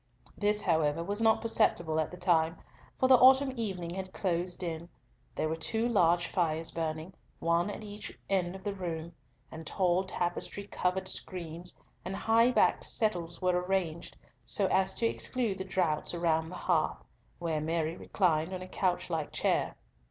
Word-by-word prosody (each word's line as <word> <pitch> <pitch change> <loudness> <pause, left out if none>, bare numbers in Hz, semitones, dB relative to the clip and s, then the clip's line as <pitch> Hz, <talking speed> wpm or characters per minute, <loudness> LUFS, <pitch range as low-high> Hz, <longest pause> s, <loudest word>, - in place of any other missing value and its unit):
This, 210 0 +1
however, 160 -2 +2
was 205 +5 -2
not 225 -1 +4
perceptible 170 -8 +2
at 155 - 0
the 180 - -9
time, 165 -2 +2 0.4
for 260 - +3
the 260 -1 +8
autumn 265 +1 +6
evening 185 -7 -3
had 190 0 -5
closed 180 -1 0
in; 170 0 -4 0.5
there - - 0
were 160 - -1
two 220 +8 0
large 175 -6 +3
fires 165 -2 0
burning, 160 +2 -3 0.2
one 170 +3 +1
at 205 - -6
each 205 0 -8
end 185 -2 0
of 190 - -10
the 205 - -2
room, 170 -3 -5 0.4
and 160 0 -8
tall 185 -1 +2
tapestry 185 +2 -3
covered 190 -1 -1
screens 175 -2 -4 0.3
and 190 - -4
high 230 +3 +4
backed 250 - +3
settles 175 -5 -1
were 185 - +4
arranged 180 -3 -2 0.3
so 200 - +1
as 190 0 +3
to 235 - +1
exclude 230 -3 -1
the - - -2
draughts 175 -4 0
around 160 -1 +1
the 180 - -8
hearth, - - 0 0.3
where 165 -3 -2
Mary 160 +1 -1
reclined 175 -2 0
on 185 - -6
a - - -9
couch 185 -1 0
like 160 -3 -2
chair. - - 0
180 Hz, 165 wpm, -31 LUFS, 165-200 Hz, 0.5 s, the